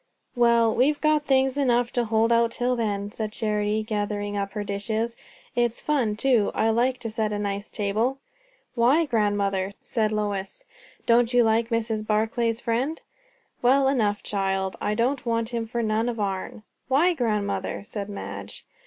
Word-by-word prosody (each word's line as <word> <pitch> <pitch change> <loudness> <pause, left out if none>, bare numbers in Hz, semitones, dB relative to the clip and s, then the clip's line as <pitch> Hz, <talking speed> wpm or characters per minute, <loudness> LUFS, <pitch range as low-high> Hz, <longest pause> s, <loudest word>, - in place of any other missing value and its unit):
"Well, 235 -2 +4
we've 285 +4 +2
got 305 -1 +2
things 265 0 +2
enough 245 -3 +2
to 240 -1 +1
hold 225 +1 +2
out 235 0 +4
till 250 +1 0
then," 205 -3 -2
said 215 -1 -4
Charity, 210 0 -1
gathering 205 -1 -2
up 200 -1 -3
her 210 -1 -3
dishes. 215 +3 -2 0.4
"It's 240 -1 +1
fun, 255 -9 0
too; 235 -3 +2
I 225 +1 +2
like 250 +3 +1
to 225 - -4
set 215 -1 -1
a 210 - -1
nice 200 0 -3
table." 220 +6 0 0.6
"Why, 255 +7 +3
grandmother?" 200 -5 0
said 215 -2 -1
Lois. 205 - -3 0.4
"Don't 235 +1 +3
you 245 - +6
like 225 +1 +2
Mrs. 225 -2 -1
Barclay's 225 +2 0
friend?" 255 +7 -1 0.6
"Well 265 +2 +4
enough, 215 -7 +1
child. 195 -1 -1
I 210 - 0
don't 250 +4 0
want 230 -1 -1
him 230 -2 -3
for 235 +1 -2
none 220 +2 +1
of 235 -2 -4
our'n." 200 +1 -3 0.2
"Why, 300 +8 +3
grandmother?" 210 -8 -2
said 205 -2 -6
Madge. 200 - -7
225 Hz, 160 wpm, -25 LUFS, 210-245 Hz, 0.6 s, you